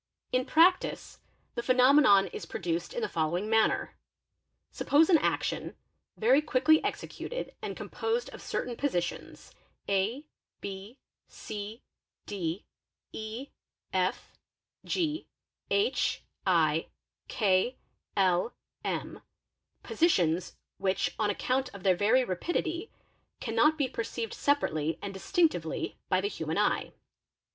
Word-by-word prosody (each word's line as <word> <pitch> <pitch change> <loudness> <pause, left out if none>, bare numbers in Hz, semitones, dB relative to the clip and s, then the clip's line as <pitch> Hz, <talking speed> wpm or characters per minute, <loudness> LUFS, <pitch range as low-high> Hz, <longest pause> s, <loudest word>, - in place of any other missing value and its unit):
In 255 0 +1
prac 355 +4 +5
EY - - -1
'tice - - -10 0.3
the - - -2
phenomenon 255 -4 +6
is - - -6
produced 170 0 -3
in 485 - -1
the 430 - 0
following 170 +5 -1
manner 220 0 +2 0.8
:—Suppose 315 +5 +3
an 325 - +7
action, - - -1 0.4
very 255 +6 +5
quickly 305 +1 +3
executed - - -4
and - - -5
composed 460 +2 -2
of - - -10
certain 245 - -3
positions 180 -11 -3 0.3
a, 205 +9 0 0.3
b,c, 205 +1 -8 0.4
d, 180 -2 -3 0.5
e, 220 +5 -6 0.4
f, - - -1 0.5
g, 320 -3 -1 0.4
h, 415 +4 +1 0.2
2, 165 -3 +3 0.4
k, 205 +3 +2 0.4
l, 185 +3 +2 0.3
m, - - -3 0.6
positions 180 - +1 0.2
which, 190 0 0
on 210 -1 +2
account 255 +5 0
of 190 - -10
their 185 -2 +4
very 220 +8 +4
rapidity, 335 - -2 0.5
cannot 250 +7 +3
be 280 -4 +1
perceived 230 -1 -4
separately 160 - 0
and 200 -1 -6
distinctively 310 - 0
by 185 - +3
the 195 - 0
human 160 -4 -3
eye. 210 - +1
225 Hz, 115 wpm, -30 LUFS, 190-285 Hz, 0.8 s, an